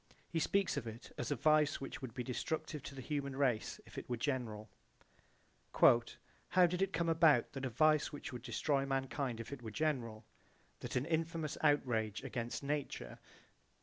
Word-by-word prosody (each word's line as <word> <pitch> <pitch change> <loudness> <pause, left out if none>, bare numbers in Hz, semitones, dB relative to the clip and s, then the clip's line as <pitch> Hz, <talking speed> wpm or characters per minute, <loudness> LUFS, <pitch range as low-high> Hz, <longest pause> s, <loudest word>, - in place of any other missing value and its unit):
He 165 - +1
speaks 195 -1 +1
of 125 -4 -3
it 115 +1 -8
as 120 - -3
a 145 - +1
vice 155 +3 +3
which 135 - -6
would 125 -4 -7
be 125 - -2
destructive 150 +4 -3
to 140 - -7
the 130 - -7
human 140 -2 -2
race 130 -5 0
if - - -7
it - - -11
were 120 - -1
general. 115 -5 -2 1.1
"How 120 +9 +3
did 180 +1 -1
it 195 0 +2
come 170 -1 0
about 165 -2 +5
that 135 -1 -4
a - - -1
vice 155 +5 +3
which 145 - -7
would 125 - -6
destroy 135 +3 0
mankind 135 -2 -1
if 115 - -6
it 135 - -8
were 115 - -6
general, 115 -5 -2 0.5
that - - -5
an 125 +2 +1
infamous 160 -1 -1
outrage 120 -8 +2
against 120 -1 -4
nature...?" 140 - -3
135 Hz, 180 wpm, -36 LUFS, 120-155 Hz, 1.1 s, about